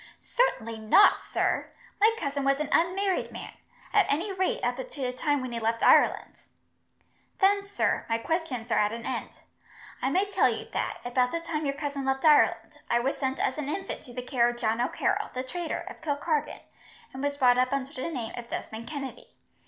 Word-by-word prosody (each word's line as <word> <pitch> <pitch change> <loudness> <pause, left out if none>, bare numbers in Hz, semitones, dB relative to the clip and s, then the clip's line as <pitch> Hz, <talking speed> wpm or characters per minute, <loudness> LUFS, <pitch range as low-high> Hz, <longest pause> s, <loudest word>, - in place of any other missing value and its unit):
"Certainly 230 - 0
not, 220 - +5
sir. - - -1 0.3
My 435 +2 +6
cousin 280 -2 -2
was 275 +1 +2
an 305 -1 -2
unmarried 370 +3 +1
man, - - -8 0.4
at 410 -3 +4
any 350 +8 0
rate 380 +6 -1
up - - 0
to - - -5
the 250 -1 -1
time 290 +2 0
when 255 -1 -5
he 235 - -3
left 230 +1 -1
Ireland." - - +4 1.0
"Then, 400 0 +3
sir, 400 0 -1
my 225 - +2
questions 255 -4 -3
are - - +3
at 210 0 +2
an 230 0 -6
end. 255 -2 -3 0.7
I 265 - +1
may 375 +8 +2
tell - - +4
you - - -4
that, - - -2
about 250 0 +1
the 335 - -1
time 315 -3 -3
your 275 - -1
cousin 285 -1 -4
left 270 +2 0
Ireland, 300 -2 +4
I 235 - +3
was 265 +3 0
sent 265 -1 -2
as 265 - -1
an 290 -1 -3
infant 385 +5 -4
to 245 - -12
the 250 - -4
care 245 -2 +2
of 240 - -5
John 225 0 0
O'Carroll, 245 - 0
the 255 - -2
traitor, 335 +5 -4
of - - -9
Kilkargan, 300 0 -1 0.5
and 265 - -6
was 285 0 -1
brought 250 -3 +5
up 255 0 +2
under 275 +1 -2
the 260 +2 -4
name 245 -8 -4
of 240 -1 -8
Desmond 225 +1 -6
Kennedy. 270 -4 -7
275 Hz, 200 wpm, -28 LUFS, 245-330 Hz, 1.0 s, My